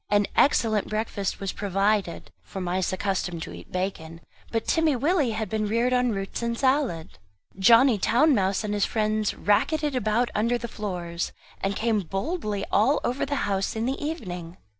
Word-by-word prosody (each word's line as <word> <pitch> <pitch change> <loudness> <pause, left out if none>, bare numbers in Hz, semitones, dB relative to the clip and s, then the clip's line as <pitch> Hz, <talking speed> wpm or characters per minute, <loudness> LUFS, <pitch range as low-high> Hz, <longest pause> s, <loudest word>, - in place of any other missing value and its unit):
An 205 0 +3
excellent 220 -7 +3
breakfast 215 -2 -2
was 195 -1 -3
provided 200 -2 -1
for 195 - -8
mice 180 0 -1
accustomed 185 -3 -2
to - - -8
eat - - -12
bacon; 170 -3 -4 0.3
but 225 -1 -1
Timmy 320 -3 +2
Willie 290 +1 +2
had 220 0 -2
been 215 +1 -1
reared 235 +4 +1
on 250 0 +2
roots 195 -1 -3
and 235 0 -1
salad. 260 - 0 0.4
Johnny 230 +2 +6
Town 285 +10 +4
mouse 195 -2 +1
and 210 -1 -2
his 205 -1 +1
friends 215 -1 0
racketted 295 +8 +1
about 235 +1 +1
under 235 +3 +1
the 235 0 -5
floors, 175 -6 -4 0.3
and 195 +1 -1
came 225 -1 +1
boldly 205 - -3
out - - -22
all 255 +8 +3
over 250 +3 -1
the 285 0 -1
house 195 0 -1
in 220 +1 -1
the 265 +3 -2
evening. 180 - -5
215 Hz, 175 wpm, -26 LUFS, 195-245 Hz, 0.4 s, Johnny